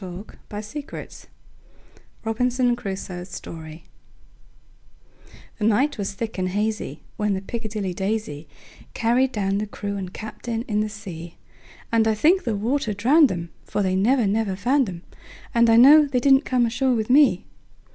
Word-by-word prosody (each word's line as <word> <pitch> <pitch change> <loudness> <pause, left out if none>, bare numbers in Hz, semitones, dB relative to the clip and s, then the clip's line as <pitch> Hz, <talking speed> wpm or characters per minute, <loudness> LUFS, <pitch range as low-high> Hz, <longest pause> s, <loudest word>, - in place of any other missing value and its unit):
Carryl1841–1920 210 - -8 1.0
Robinson 245 +2 +1
Crusoe's 190 -5 -6
Story 160 -2 -9 1.8
THE 210 - 0
NIGHT 245 +5 +2
was 195 0 -3
thick 220 0 -5
and 185 0 0
hazyWhen 210 0 -2
the 190 - -4
"Piccadilly 215 -5 -4
Daisy"Carried 220 - -2
down 200 -3 -1
the 210 - -3
crew 200 0 -5
and 185 -2 -5
captain 225 +3 -5
in 210 -3 -1
the 215 0 0
sea; 175 -6 -9 0.5
And 225 -1 +3
I 220 - +2
think 335 - +3
the 230 -3 0
water 225 +1 -1
drowned 275 +8 +4
'em; 170 -2 -4
For 205 - -2
they 185 -1 0
never, 235 +5 +3
never 205 -1 0
found 250 +4 +1
'em, 175 -1 -8 0.5
And 235 0 +4
I 225 - +6
know 290 +5 +8
they 265 -3 0
didn't 270 +2 +4
come 250 -2 +2
ashore 250 +2 +1
with 220 +1 -1
me. 265 -9 +5
215 Hz, 145 wpm, -23 LUFS, 195-245 Hz, 1.8 s, know